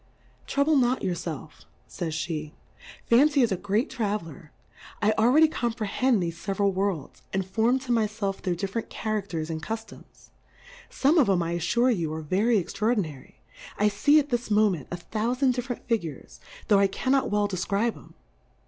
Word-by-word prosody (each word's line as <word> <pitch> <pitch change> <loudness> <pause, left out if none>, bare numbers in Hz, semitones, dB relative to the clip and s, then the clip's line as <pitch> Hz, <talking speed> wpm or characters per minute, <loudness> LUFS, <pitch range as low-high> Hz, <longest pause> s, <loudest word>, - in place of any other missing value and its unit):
Trouble 285 +2 +2
not 255 0 +2
your 185 -2 0
felf, 155 -3 -7 0.2
fays 165 -3 -4
Jl:e^ 155 -2 -4 0.5
Fancy 280 +3 +4
is 230 - +1
a - - +2
great 205 - 0
Traveller; 195 -7 -4 0.5
I 215 0 +3
al 220 +1 +3
ready 310 +5 +6
comprehend 235 - 0
thefe 170 -1 -2
feveral 195 +3 -1
Worlds, 190 -6 -2
and 190 -1 -1
form 225 +7 +2
to 260 -2 -5
my 225 -2 +3
felf 205 -2 -4
their 180 -2 -1
different 195 +5 -4
Cha 215 - -4
rafters 175 -7 -3
and 160 -1 -4
Cuftoms; 225 +4 -8 0.6
Ibme 300 +4 +3
of 245 - +2
'em, 180 -3 +2
I 165 - -3
affure 235 +9 +2
you, 170 -8 -1
are 160 - -5
very 210 +9 +2
extraordinary; 195 - -2 0.4
I 210 +1 +3
fee 290 +9 +4
at 295 -1 +2
this 240 -2 -2
Moment, 210 -8 +2
a 175 - -4
thoufand 245 +8 0
diffe 245 +1 -4
rent 245 - -5
Figures, 160 - -3 0.3
tho' 205 - +5
I 200 - +4
cannot 265 +7 0
well 205 0 +1
defcribe 200 +4 -1
'em. - - -16
210 Hz, 175 wpm, -26 LUFS, 180-240 Hz, 0.6 s, ready